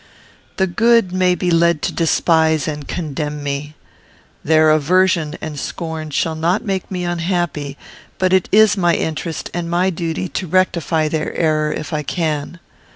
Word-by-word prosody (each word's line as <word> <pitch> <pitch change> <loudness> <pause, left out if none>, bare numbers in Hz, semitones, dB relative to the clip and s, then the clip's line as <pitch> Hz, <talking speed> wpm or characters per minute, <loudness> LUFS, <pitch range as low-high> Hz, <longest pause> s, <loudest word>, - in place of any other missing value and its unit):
The 190 - +3
good 225 +2 +3
may 185 -1 +2
be 180 -1 -1
led 170 -2 +3
to - - -1
despise 160 -2 +2
and 150 -2 -5
condemn 150 -2 -4
me. 145 +1 -4 0.7
Their 155 0 +4
aversion 165 +1 +2
and 150 -2 -5
scorn 160 -1 -5
shall 160 +2 0
not 170 +5 0
make 195 -3 -2
me 180 -2 -3
unhappy; 170 -5 -2 0.4
but 185 0 +1
it 190 -1 +2
is 215 -1 +5
my 175 -3 +2
interest 160 0 -3
and 170 -1 -3
my 180 +2 +1
duty 170 +1 -3
to 185 - -4
rectify 165 -3 +1
their 155 0 -3
error 155 -2 +1
if 155 +1 -5
I 150 - 0
can. 155 +1 -3
165 Hz, 155 wpm, -18 LUFS, 155-180 Hz, 0.7 s, is